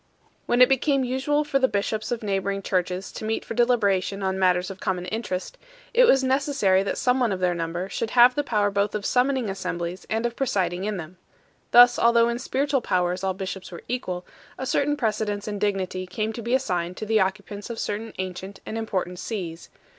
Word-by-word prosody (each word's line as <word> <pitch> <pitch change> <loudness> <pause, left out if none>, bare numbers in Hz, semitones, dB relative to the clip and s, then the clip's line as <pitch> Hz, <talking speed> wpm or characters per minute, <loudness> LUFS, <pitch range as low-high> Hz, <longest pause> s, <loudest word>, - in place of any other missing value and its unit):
When 245 +1 +6
it - - +7
became 270 +1 +2
usual 265 +4 0
for 275 -2 0
the 260 - +4
bishops 215 +1 -2
of 235 -2 -2
neighbouring 195 -1 -1
churches 185 0 -1
to - - -8
meet 220 +1 -2
for - - -5
deliberation 200 -5 +1
on 190 0 -1
matters 180 0 +2
of 195 - -10
common 180 -1 -2
interest, 205 - -4 0.3
it - - +6
was 270 - +5
necessary 260 -8 +2
that 200 - -2
some 250 +1 +2
one 240 -4 +2
of 190 - -2
their 180 -1 +2
number 170 +2 -3
should 220 +3 -3
have 245 +1 +8
the 290 - -1
power 210 -6 +1
both 200 +1 0
of 205 -1 -3
summoning 255 -1 +2
assemblies 180 -2 -4
and 225 +2 0
of 235 0 -2
presiding 190 -8 -1
in 210 -1 -2
them. 175 +1 -8 0.5
Thus, 245 0 +7
although 235 0 +4
in 235 0 -2
spiritual 275 +1 0
powers 180 -2 0
all 190 -1 0
bishops 190 -1 -6
were 170 - -9
equal, 185 -8 -3 0.3
a 260 - -4
certain 290 +3 +1
precedence 215 -4 -1
in 205 -1 -3
dignity 190 -2 -1
came 215 +4 -2
to 235 - -6
be 235 +3 +1
assigned 180 -8 -1
to - - -4
the 220 0 +2
occupants 200 +2 -2
of 235 - -5
certain 220 +1 -3
ancient 185 +1 -6
and 225 - -4
important 185 -5 -3
sees. 175 -6 -5
205 Hz, 205 wpm, -25 LUFS, 185-245 Hz, 0.5 s, have